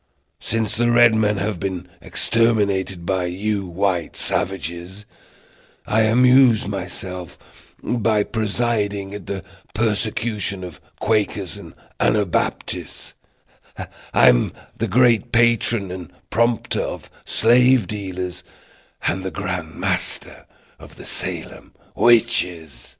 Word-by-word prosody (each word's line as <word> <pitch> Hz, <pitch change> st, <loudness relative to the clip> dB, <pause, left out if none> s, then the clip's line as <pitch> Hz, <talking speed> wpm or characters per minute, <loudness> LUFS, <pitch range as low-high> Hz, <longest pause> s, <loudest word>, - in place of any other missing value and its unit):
Since 110 Hz, -1 st, -2 dB
the 120 Hz, +1 st, +2 dB
red 120 Hz, -1 st, +6 dB
men 105 Hz, -2 st, +2 dB
have 100 Hz, -2 st, -2 dB
been 95 Hz, -3 st, -4 dB
exterminated 100 Hz, -6 st, +1 dB
by 95 Hz, 0 st, 0 dB
you 100 Hz, +2 st, -2 dB
white 90 Hz, -1 st, -1 dB
savages, 90 Hz, +2 st, -3 dB, 0.8 s
I 110 Hz, -, +2 dB
amuse 125 Hz, +1 st, +5 dB
myself 90 Hz, -2 st, -6 dB, 0.5 s
by 110 Hz, -3 st, +1 dB
presiding 105 Hz, -3 st, -1 dB
at 100 Hz, -3 st, -8 dB
the 95 Hz, -3 st, -4 dB, 0.3 s
persecutions 105 Hz, -2 st, -1 dB
of 90 Hz, -5 st, -9 dB, 0.2 s
Quakers 105 Hz, -5 st, 0 dB
and -, -, -12 dB, 0.2 s
Anabaptists; 105 Hz, -5 st, -1 dB, 0.6 s
I -, -, 0 dB
am -, -, +4 dB, 0.2 s
the -, -, -2 dB
great 120 Hz, -4 st, +3 dB
patron 115 Hz, -4 st, +2 dB
and 90 Hz, -3 st, -8 dB, 0.2 s
prompter 115 Hz, +1 st, +1 dB
of -, -, -6 dB
slave 125 Hz, 0 st, +4 dB
dealers 95 Hz, -3 st, -5 dB, 0.6 s
and 95 Hz, +1 st, 0 dB
the 95 Hz, -, -2 dB
grand 90 Hz, -2 st, -4 dB
master -, -, -3 dB, 0.3 s
of -, -, -14 dB
the -, -, -12 dB
Salem -, -, -4 dB, 0.2 s
witches." 90 Hz, -, +1 dB
100 Hz, 105 wpm, -21 LUFS, 90-115 Hz, 0.8 s, red